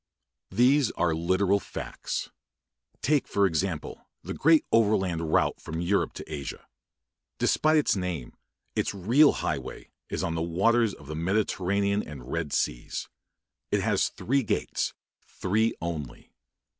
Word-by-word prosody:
These 125 +6 +4
are 85 -2 +1
literal 95 +4 +2
facts. - - -5 0.7
Take, 145 0 +2
for 100 -1 +2
example, 80 -2 -2
the - - -5
great 160 +1 +4
Overland 95 -8 +2
Route - - +2
from 80 +1 -5
Europe 90 +4 +1
to 80 - -8
Asia. 70 -2 -6 0.7
Despite 155 0 +3
its 150 - +3
name, 90 -9 -3 0.4
its - - 0
real 120 +11 +5
highway - - -4 0.2
is - - -2
on 85 - -1
the 80 - -2
waters 105 +7 +2
of 75 - -15
the 75 +2 -6
Mediterranean 100 +3 +1
and 65 -7 -9
Red 80 -3 -2
Seas. - - -2 0.6
It - - +1
has - - +2
three 135 +3 0
gates 115 - -1 0.3
three 110 +4 0
only. 80 -5 -6
95 Hz, 130 wpm, -27 LUFS, 80-110 Hz, 0.7 s, real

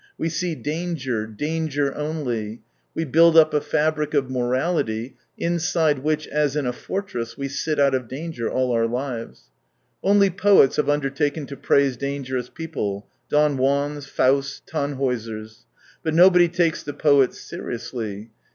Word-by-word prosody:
We 165 - -1
see 170 0 -2
danger, 150 -9 -3
danger 145 +3 -2
only, 120 -8 -4 0.3
we 165 - -1
build 165 +3 +5
up 155 -1 +6
a 150 - +2
fabric 150 0 0
of 135 -2 +1
morality 125 -1 -1 0.2
inside 165 -3 +1
which 155 +2 -1
as 150 -2 0
in 150 -3 0
a 125 - -1
fortress 120 - -5
we 140 - -3
sit 145 +2 -2
out 140 -1 +4
of 130 -2 -1
danger 135 -2 -4
all 130 -1 0
our 115 -1 +2
lives. 120 - -5 0.5
Only 200 0 +4
poets 195 -6 +4
have 150 - +1
undertaken 145 +1 0
to 140 - -8
praise 140 -2 +2
dangerous 130 -2 -3
people 105 -12 -4
— 120 - -46
Don 150 -1 +3
Juans, 140 +2 0
Fausts, 140 +1 +1
Tannhaiisers. 120 -7 -3 0.4
But 160 -1 -1
nobody 180 0 +7
takes 170 -1 0
the 145 - -6
poets 140 -4 +3
seriously. 115 -3 -6
140 Hz, 145 wpm, -23 LUFS, 125-155 Hz, 0.5 s, nobody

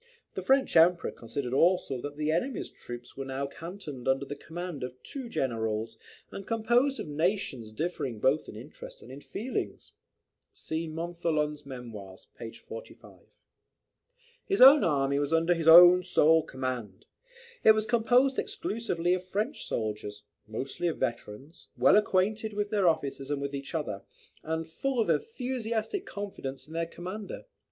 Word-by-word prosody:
The - - -4
French 270 0 +2
Emperor 170 +1 +5
considered 125 +2 -5
also 150 -4 +2
that 145 +1 -6
"the 155 0 0
enemy's 215 +11 -2
troops 120 0 -10
were 135 - -4
now 135 +1 -3
cantoned 165 -4 -8
under 135 +1 +2
the 145 - -6
command 165 -1 -6
of 125 0 -5
two 265 -4 -5
generals, 110 - -2 0.3
and 195 - -8
composed 240 +5 +2
of - - -5
nations 150 - -1
differing 135 -4 -3
both 135 +7 +1
in - - -9
interest 125 +8 -11
and 125 - -12
in 135 +2 -9
feelings." 205 - -5 0.6
[See 160 +1 -4
Montholon's 155 -3 -2
Memoirs, 110 -8 -9
p. 115 -1 -7
45.] 475 - -11 1.3
His 395 - 0
own 275 +3 +9
army 140 -3 +1
was 145 +1 -1
under 165 +2 +3
his 165 -2 -3
own 175 +2 +10
sole 160 -3 +4
command. 125 -9 -5 0.6
It 220 - +8
was 215 0 0
composed 245 +4 +3
exclusively 180 -6 -1
of 185 0 -1
French 210 +10 -3
soldiers, 105 -2 -4 0.2
mostly 135 +10 -3
of 165 - -2
veterans, 125 +4 -5
well 125 +2 +6
acquainted 210 +2 +1
with 205 0 -2
their 200 -5 +4
officers 140 -3 -2
and 145 -1 -1
with 140 0 -4
each 140 +3 -5
other, 105 -11 -3 0.4
and 160 +1 -3
full 260 +10 -2
of 225 - +3
enthusiastic 255 - -2
confidence 135 -10 -6
in 160 - -12
their 165 0 -1
commander. 185 +5 -7
160 Hz, 150 wpm, -29 LUFS, 135-205 Hz, 1.3 s, own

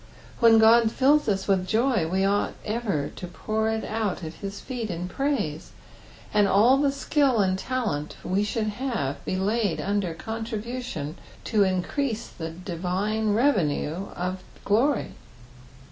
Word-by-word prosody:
When 230 -1 +7
Ood 225 0 +6
fills 285 +1 +3
us 195 -1 -1
with 190 -2 +2
joy 225 -4 +2
we 190 +3 +1
ought 200 +1 +1
ever 210 -10 -1
to 180 - -6
pour 220 +5 -2
it 220 0 -1
out 215 -4 -2
at 160 0 -5
his 200 +2 -7
feet 240 -4 -5
in 175 0 -3
praise, 185 - -2 0.6
and 205 -1 +4
all 225 +7 +5
the 280 0 +2
skill 275 -2 +1
and 190 -3 +2
talent 200 - -2
we 185 +2 0
have - - -2 0.3
should 205 - -3
be - - -1
laid 205 +1 0
under 195 -4 -1
contribution 225 - -5 0.2
to 220 - 0
mcrease 210 +6 -1
the 160 -1 -5
divine 185 +5 -1
revenue 190 - +1
of 185 +1 -3 0.2
glory. 235 +6 +2
205 Hz, 145 wpm, -26 LUFS, 185-235 Hz, 0.6 s, When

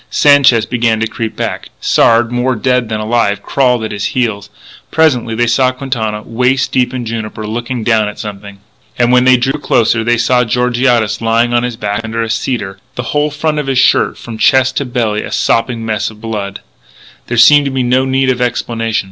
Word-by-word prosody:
Sanchez 140 -6 +4
began 115 -2 0
to 110 - 0
creep 115 0 -5
back; - - -4
Sard, 115 0 +3
more 125 +1 0
dead 125 +1 0
than 110 -1 -2
alive, 110 -2 0
crawled 125 -4 +1
at 110 - -4
his 100 -1 -5
heels. 105 -5 -1 0.4
Presently 125 -8 +1
they 120 +1 +1
saw 125 +2 +2
Quintana, 115 -5 -4
waist 125 +3 0
deep 125 -1 +1
in 125 -2 -5
juniper, 110 -1 -5
looking 120 +2 -4
down 110 -2 +2
at 105 - -7
something. 100 -1 -9 0.4
And 120 0 +2
when 125 0 +4
they 130 0 +6
drew 135 +4 -1
closer 115 -4 +1
they 120 +1 +1
saw 125 +1 +2
Georgiades 125 -1 0
lying 115 +1 +1
on 120 - +3
his 120 -2 -4
back 105 0 -2
under 115 +1 -3
a 110 - -3
cedar, 110 -4 -3 0.2
the 125 - -4
whole 150 0 +1
front 150 +1 -2
of 145 - -4
his 135 -1 0
shirt - - +3
from 115 -2 -9
chest 130 +1 +3
to 140 - -1
belly 115 -4 -1
a - - -7
sopping 115 0 0
mess 110 -2 -2
of 110 -1 -14
blood. 105 -3 -5 0.7
There 120 - -3
seemed 145 +4 +5
no 130 0 +1
need 130 0 +1
of 125 -1 -3
explanation. 115 -2 -1
120 Hz, 195 wpm, -13 LUFS, 110-130 Hz, 0.7 s, they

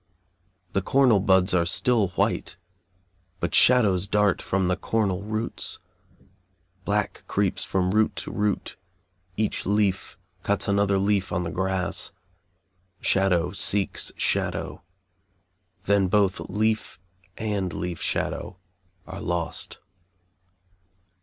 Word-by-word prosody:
The 100 - +1
cornel 125 0 +4
buds 95 -1 +3
are 90 -2 +3
still 110 +5 +2
white, - - -1 0.8
but - - -2
shadows 100 -7 +5
dart 105 -2 +2
from 95 -1 0
the 90 - +1
cornel 100 -2 -1
roots 110 +2 -3 1.1
black 105 0 -1
creeps - - +1
from 90 -1 0
root 110 +2 +2
to - - -6
root, 105 -1 -2 0.6
each 110 -1 -1
leaf 100 -2 0 0.2
cuts 100 +1 0
another 100 -1 +2
leaf 100 -1 0
on 90 - -1
the 85 - -4
grass, 95 0 -1 0.9
shadow 90 -3 +2
seeks 100 0 +1
shadow, - - -1 1.0
then 100 -1 +3
both 95 0 +2
leaf 110 +3 -1 0.4
and 100 -4 -2
leaf 90 -1 -5
shadow 90 - -2 0.5
are 95 +1 -8
lost. 85 -5 -3
100 Hz, 105 wpm, -25 LUFS, 95-105 Hz, 1.1 s, shadows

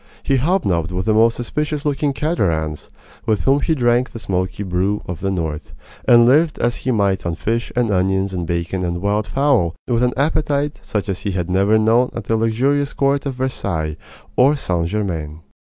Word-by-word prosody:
He 135 - +2
hobnobbed 100 - 0
with 90 +1 -2
the 110 - +2
most 115 +2 +4
suspicious 150 +4 -3
looking 145 0 0
caterans, 85 - -1 0.4
with 110 -2 +1
whom 135 +1 +3
he 160 +2 +1
drank 120 -1 +2
the - - -9
smoky 95 -2 -2
brew 95 +2 -1
of 85 -3 -6
the 95 - -1
North, 80 -3 -4 0.3
and 120 -1 +7
lived 150 +6 +3
as 120 - 0
he 130 - -4
might 100 -5 +1
on 85 -1 -2
fish 115 +7 -2
and 120 -3 +1
onions 95 0 +1
and 90 -2 -3
bacon 85 +2 -2
and 85 -1 -2
wild 105 +2 0
fowl, 130 - +1
with 120 -1 +1
an 125 0 +2
appetite 145 0 0
such 105 -1 -3
as 95 -2 -2
he 100 - -2
had 90 -1 -2
never 100 +4 +3
known 115 +3 +3
at 115 - -4
the 115 - 0
luxurious 130 +6 +1
court 140 +1 +1
of 135 - -3
Versailles 95 - -2 0.4
or 135 +4 +5
St. 85 - -1
Germain. 85 -6 -3
110 Hz, 190 wpm, -19 LUFS, 90-130 Hz, 0.4 s, and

